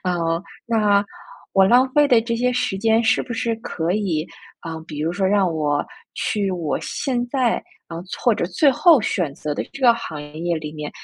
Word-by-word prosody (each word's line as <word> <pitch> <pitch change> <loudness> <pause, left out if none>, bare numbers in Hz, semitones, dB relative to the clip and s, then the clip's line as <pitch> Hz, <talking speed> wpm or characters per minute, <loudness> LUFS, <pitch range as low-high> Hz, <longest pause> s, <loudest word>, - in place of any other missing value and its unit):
嗯， 170 -1 -1 0.2
那 210 -3 +3 0.5
我 195 0 +5
浪 250 +6 +5
费 295 0 +5
的 240 -4 +5
这 230 +1 -2
些 250 +1 +1
时 245 -5 -1
间 225 +3 +2
是 225 +2 +2
不 245 - -7
是 230 0 -1
可 175 -6 -3
以， 180 -7 -1 0.3
啊， 165 -1 -6
比 150 -2 -7
如 160 +3 -1
说 190 0 0
让 195 -2 +2
我 145 -1 0 0.3
去 200 -2 -1
我 165 -6 -2
现 245 -3 -2
在， 250 -3 +1 0.3
啊， 165 - -7 0.3
或 240 -3 +4
者 - - -1
最 275 - +3
后 315 +2 +5
选 180 -8 -1
择 150 -2 -4
的 - - -2
这 275 - -9
个 240 -2 +6
行 160 -10 -6
业 160 +3 -3
里 150 -1 -7
面， 150 -1 -6
195 Hz, 210 characters per minute, -21 LUFS, 165-235 Hz, 0.5 s, 个